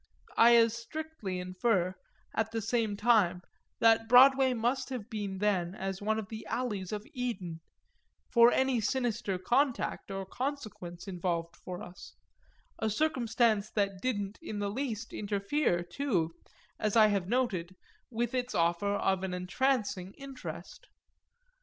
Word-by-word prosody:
I 235 +1 +7
as 230 -1 +5
strictly 235 -5 -5
infer, 185 0 0 0.4
at 220 -1 0
the 225 0 -2
same 220 -1 0
time, 205 -6 +3 0.4
that 225 0 +4
Broadway 265 +1 +7
must 245 +4 0
have 245 -4 -6
been 205 -3 -3
then 190 -3 0
as 195 -1 -4
one 215 +1 0
of 220 -3 -4
the 220 -1 -7
alleys 210 -7 -2
of 210 0 -4
Eden, 195 - -4 0.7
for 235 0 +7
any 260 -3 +2
sinister 235 -4 -1
contact 245 +8 0
or 195 0 -4
consequence 215 -8 -5
involved 175 -2 -2
for 180 -1 -7
us; 180 +1 -11 0.6
a 220 - 0
circumstance 230 -5 +1
that 195 -3 -1
didn't 205 -5 -2
in 215 -10 -5
the 205 0 -1
least 235 -2 -4
interfere, 200 - 0
too, 175 - -1 0.5
as 215 0 0
I 220 -1 +8
have 200 -3 0
noted, 200 -8 0 0.3
with 235 +1 -2
its 250 -1 -2
offer 170 +4 +1
of 190 -2 +1
an 190 -1 -3
entrancing 200 -1 -1
interest. 275 - -9
215 Hz, 140 wpm, -31 LUFS, 190-245 Hz, 0.7 s, I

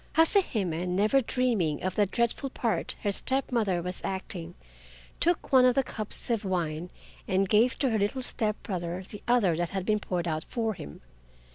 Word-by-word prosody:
Hase 325 +5 +5
Hime, 180 -4 -1
never 215 +8 +3
dreaming 230 - 0
of 185 -1 -1
the 205 0 +2
dreadful 235 +6 0
part 235 -4 -2
her 205 - +1
step 265 +7 +1
mother 200 -8 +1
was 180 +1 -5
acting, 180 -3 -4 0.6
took 345 0 +1
one 260 -1 +8
of 250 -1 +5
the 270 - +3
cups 215 0 -5
of 225 -2 0
wine 175 -3 -2 0.4
and 190 +1 +2
gave 225 +5 +3
to 265 -4 +1
her 220 - +1
little 205 +6 0
step 215 -4 -1
brother 180 -2 -3
the 210 - -6
other 230 -9 +3
that 175 +1 -1
had 190 -2 -3
been 215 0 +2
poured 175 -4 -2
out 155 -1 -1
for 225 -2 -2
him. 75 - -10
205 Hz, 185 wpm, -28 LUFS, 180-240 Hz, 0.6 s, one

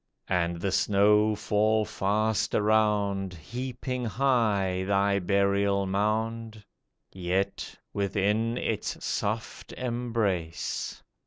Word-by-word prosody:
And 85 -2 0
the 95 - 0
snow 105 +2 +3
fall 105 +1 +1
fast 105 +2 0
around, 105 -3 +1
Heaping 125 - -5
high 110 -7 +1
thy 100 +1 +2
burial 100 +1 +2
mound; 110 +2 -2 0.5
Yet, 95 +1 -2 0.2
within 105 +4 0
its 110 -4 -3
soft 110 +2 -3
embrace. 115 -9 -2
105 Hz, 85 wpm, -28 LUFS, 100-110 Hz, 0.5 s, snow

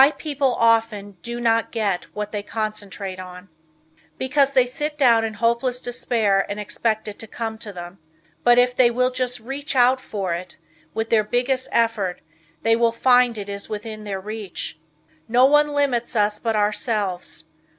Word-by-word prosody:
Why 275 - +8
People 285 -4 -1
Often 225 -4 +1
Do 235 +5 -5
Not 230 -1 +1
Get 205 -6 -1
What 210 0 -4
They 210 - -3
Concentrate 205 -3 -5
On. 180 +1 -10 0.7
Because 275 +1 +2
they 255 -2 +5
sit 295 +4 -4
down 235 -5 +5
in 220 -1 -3
hopeless 235 +3 +1
despair 225 -5 +1
and 205 +1 -4
expect 215 +1 -1
it 205 - -7
to 225 - -8
come 225 0 -5
to 220 -2 -7
them. 175 0 -9 0.4
But 240 0 +6
if 250 0 +4
they 250 -2 +5
will 250 +2 +1
just 250 -1 -1
reach 275 +5 -5
out 255 +1 +4
for 195 -7 -3
it 175 +1 -6 0.4
with 225 0 -2
their 220 -2 +4
biggest 250 +4 0
effort 220 -6 0 0.4
they 225 0 +4
will 230 0 +3
find 245 0 +4
it 205 -1 -5
is 200 0 -6
within 215 0 -6
their 200 -2 -4
reach. 205 -5 -6 0.5
No 245 +3 +5
one 295 +2 +5
limits 280 -5 0
us 210 -1 +1
but 225 -2 -1
ourselves. 205 -5 -1
225 Hz, 170 wpm, -22 LUFS, 205-250 Hz, 0.7 s, Why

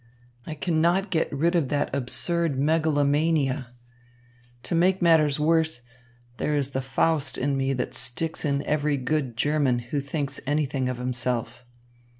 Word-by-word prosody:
I 155 - -5
cannot 170 +6 +1
get 160 - 0
rid 165 +5 +1
of 155 -7 +1
that 145 -2 -1
absurd 155 +4 0
megalomania. 145 -2 +1 1.0
To - - -4
make 180 +3 +3
matters 155 -4 +3
worse, 160 -4 +1 0.5
there 150 - -1
is 140 -1 -1
the 135 - -2
Faust 145 +3 +1
in 140 +1 0
me 135 0 0
that 125 -2 -3
sticks 160 +7 -2
in 140 -2 0
every 150 -1 0
good 130 -2 -2
German 145 -3 +1 0.2
who 145 - +2
thinks 140 0 -4
anything 140 -3 0
of 125 - -3
himself. 120 -1 -3
145 Hz, 145 wpm, -25 LUFS, 135-160 Hz, 1.0 s, make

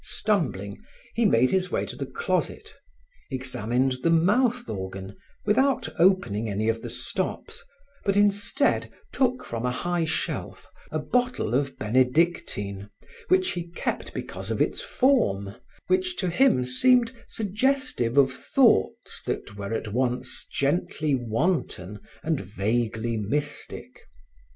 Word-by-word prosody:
Stumbling, 130 - -1 0.3
he 235 - +2
made 130 - +4
his 185 -1 +1
way - - -1
to - - -7
the - - -4
closet, 465 +1 -2 0.6
examined 130 -1 0
the 165 - +2
mouth 235 +9 +3
organ 95 0 -6 0.3
without 255 +3 +2
opening 115 - +3
any 105 +2 -1
of 115 0 -1
the - - -6
stops, - - -2 0.4
but 200 0 +1
instead 205 +7 +2 0.2
took 255 -1 +1
from 115 0 -4
a 125 - +1
high 175 +7 -1
shelf 160 - -3 0.3
a - - -1
bottle 245 - 0
of 140 +2 0
benedictine 120 - +1 0.4
which 370 0 +3
he 175 -1 -4
kept - - -3
because - - -5
of - - -1
its - - +1
form 100 - +2 0.3
which 370 -1 +1
to 180 -2 -1
him 225 - +4
seemed 245 - +4 0.2
suggestive 220 - 0
of 135 -2 +5
thoughts 235 - +2
that 100 - -3
were 100 0 -5
at 115 -1 -2
once 125 0 -1
gently 150 +1 0
wanton 115 - -1 0.2
and 160 -3 0
vaguely 110 +3 -1
mystic. 145 +8 -4
145 Hz, 125 wpm, -26 LUFS, -, 0.6 s, of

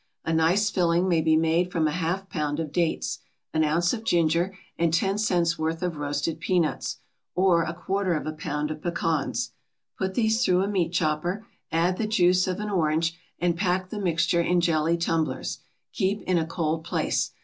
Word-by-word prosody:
A 165 - 0
nice 175 +7 +3
filling 175 0 +2
may 170 -3 +3
be 160 0 +3
made 165 +3 +2
from 160 -3 +1
a - - 0
half 180 +4 -2
pound 150 -4 -2
of 155 -3 -3
dates, 170 0 -1 0.3
an 155 - +2
ounce 170 +3 +2
of 225 -2 -4
ginger, 175 0 +1 0.2
and 170 -1 +1
ten 195 +5 +1
cents' 175 -6 +1
worth 160 +2 -2
of 175 -3 -2
roasted 145 +2 -2
peanuts, 170 -1 0 0.4
or 180 -2 +4
a 165 +1 -3
quarter 190 0 -1
of 155 - -3
a 155 - -2
pound 150 -1 -3
of 155 0 -6
pecans. 165 -4 -1 0.5
Put 190 0 -2
these 220 0 +2
through 180 +1 +3
a - - -1
meat 185 -5 0
chopper, 175 +5 -1 0.3
add 175 +3 +1
the 220 - 0
juice 180 -3 +3
of 185 +1 -2
an 210 0 -3
orange, 165 -2 +1 0.2
and 175 -1 +1
pack 185 0 0
the 210 - -5
mixture 170 -1 +2
in 175 +1 +2
jelly 165 -1 +2
tumblers. 160 -5 -1 0.3
Keep 200 +2 0
in 180 -2 +2
a 160 - -2
cold 160 -1 -1
place. - - -1
170 Hz, 190 wpm, -26 LUFS, 160-185 Hz, 0.5 s, or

